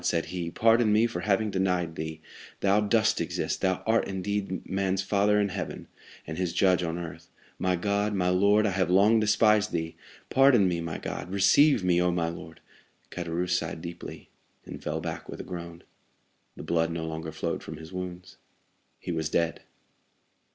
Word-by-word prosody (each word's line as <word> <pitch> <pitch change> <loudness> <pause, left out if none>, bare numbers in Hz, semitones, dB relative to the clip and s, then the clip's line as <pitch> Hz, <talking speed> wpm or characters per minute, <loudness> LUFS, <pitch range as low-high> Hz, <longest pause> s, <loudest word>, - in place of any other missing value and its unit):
said 85 -2 +1
he, 85 -2 -3
"pardon 115 +3 +3
me 110 +2 +4
for 115 -7 -3
having 105 +3 +1
denied 90 -3 0
thee; 80 0 -5 0.4
thou 100 +1 +3
dost 110 +1 +2
exist, - - -2
thou 95 -1 0
art 115 +1 +2
indeed 95 0 -3
man's 95 0 0
father 105 +2 +2
in 100 -1 +1
heaven, - - -5 0.4
and 80 +2 -6
his 90 -2 -1
judge 95 -2 +3
on 85 -1 -2
earth. 85 -2 -8 0.3
My 90 0 +1
God, 100 +3 0
my 90 -2 +1
Lord, 100 +4 +4
I 105 - +1
have 95 -2 0
long 100 +5 +5
despised 105 0 +3
thee! 80 0 -3 0.4
Pardon 130 -7 +5
me, 85 -2 -1
my 85 -1 -4
God; - - -6
receive 100 +6 +4
me, 90 -1 +3
Oh, 90 - +2
my 85 -1 0
Lord!" 80 -1 -10 0.5
Caderousse 90 +1 -2
sighed 80 0 -6
deeply, 85 0 -9 0.3
and - - -9
fell - - -3
back - - -6
with - - -7
a - - -5
groan. 85 -1 -8 0.7
The - - -9
blood 80 +1 0
no 85 -1 -3
longer 80 0 -5
flowed 80 +2 -3
from - - -8
his 80 +3 -11
wounds. 90 0 -7 0.6
He - - -6
was 80 -2 -2
dead. 85 +1 0
90 Hz, 180 wpm, -27 LUFS, 85-100 Hz, 0.7 s, long